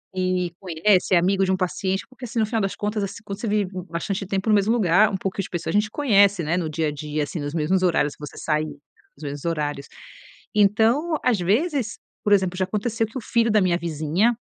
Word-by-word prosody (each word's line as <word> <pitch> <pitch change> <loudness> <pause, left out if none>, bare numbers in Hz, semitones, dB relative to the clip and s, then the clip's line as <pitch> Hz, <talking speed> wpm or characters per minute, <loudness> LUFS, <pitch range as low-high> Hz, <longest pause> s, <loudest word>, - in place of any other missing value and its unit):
e 185 -1 0
conhece, 185 +2 +2
é - - +7
amigo 190 +3 +2
de 190 - 0
um 190 - +1
paciente, 190 +1 -1
porque, 255 0 -10
assim, 235 0 -3
no 220 - +3
final 225 +1 -1
das 195 -1 -2
contas, 210 0 -2
assim, 200 - -5
quando 200 -2 -6
você 230 - -3
vive 205 -1 +1
b 185 -2 -6
bastante 190 +4 -3
tempo 195 +2 -2
no 215 - +5
mesmo 205 +2 +2
lugar, 210 -2 +4
um 195 - -1
pouco 190 +1 -4
as 195 - -1
pessoas, 175 +2 -3
a - - +6
gente 210 0 -2
conhece, 200 - +3
né. 165 +3 0
No 170 -3 -2
dia 155 +1 -1
a - - -1
dia, 150 +1 -3
assim, 155 +3 -5
nos 145 0 -4
mesmos 170 +4 +1
horários, 160 -5 +2
que - - -37
você - - -11
sair. 155 -1 0 0.5
Nos 150 - -13
mesmos 145 0 -6
horários. 150 -4 -2 0.7
Então, 225 +10 +3
às 245 -5 +2
vezes, 230 - 0 0.3
por 205 - +3
exemplo, 185 -2 +2
já 185 - +1
aconteceu 225 +3 -1
que 225 - -8
o - - -4
filho 230 0 +1
da 210 -1 +4
minha 180 -2 +2
vizinha, 170 +7 0
190 Hz, 240 wpm, -23 LUFS, 170-215 Hz, 0.7 s, é